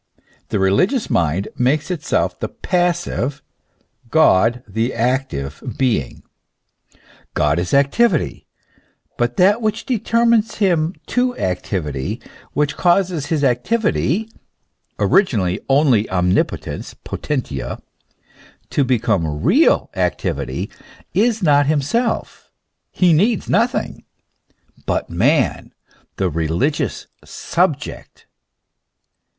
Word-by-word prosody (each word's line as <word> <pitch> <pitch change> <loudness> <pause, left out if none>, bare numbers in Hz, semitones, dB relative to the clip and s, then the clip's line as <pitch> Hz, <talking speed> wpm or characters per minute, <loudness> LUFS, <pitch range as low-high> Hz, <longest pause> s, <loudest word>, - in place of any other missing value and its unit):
The - - 0
religious 100 - +1
mind 85 +4 0
makes 145 +7 +1
itself 175 -5 -1
the - - -2
passive, 175 -6 -1 0.7
God 120 -5 +3
the 115 +5 -2
active 115 - -2 0.2
being. 110 - -1 1.1
God 75 +2 +2
is 90 - -3
activity; 150 - +2 0.7
but 120 0 -1
that 205 +5 +4
which 215 0 -1
determines 230 -1 +2
him 175 -4 +1
to 250 0 0
activity, 90 - -3 0.3
which 145 -1 0
causes 175 -4 +1
his 155 -3 0
activity 215 - +1 0.7
(originally 105 - +2
only 135 -6 +3
omnipotence, 90 0 -1
potentia) 130 - -4 0.9
to 145 - +2
become 105 - 0
real 285 - +3
activity, - - -2 0.4
is 220 0 +1
not 145 -3 +4
himself, 155 - -1 0.4
he 180 -3 +3
needs 205 +7 +2
nothing, - - 0 0.8
but - - -1
man, - - +1 0.5
the 95 - +1
religious 85 - -1 0.2
sub - - 0
ject. - - -10
140 Hz, 90 wpm, -19 LUFS, -, 1.1 s, that